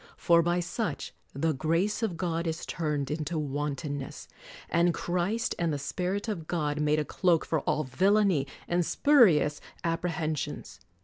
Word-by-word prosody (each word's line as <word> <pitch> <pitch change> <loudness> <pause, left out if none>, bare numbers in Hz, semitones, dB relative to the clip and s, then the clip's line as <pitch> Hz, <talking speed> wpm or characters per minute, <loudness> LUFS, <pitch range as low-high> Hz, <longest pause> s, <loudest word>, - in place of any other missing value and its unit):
For 170 -1 +4
by 175 +1 +1
such 175 -2 -3 0.2
"the 155 +4 0
grace 165 - 0
of 200 -7 -1
God 170 -1 -1
is 160 +1 -3
turned 150 -4 -2
into 155 +2 -2
wantonness," 145 -1 -3 0.4
and 170 0 +2
Christ 185 +7 -1
and 170 -2 +1
the 145 - -1
Spirit 180 +9 -2
of 175 -8 -4
God 150 -3 -1
made 150 0 +2
a 155 - 0
cloak 175 -1 +2
for 160 - 0
all 155 - +1
villainy 185 +1 +2 0.2
and 175 0 +2
spurious 180 - +4 0.2
apprehensions. 165 -3 -2
165 Hz, 145 wpm, -29 LUFS, 150-180 Hz, 0.4 s, For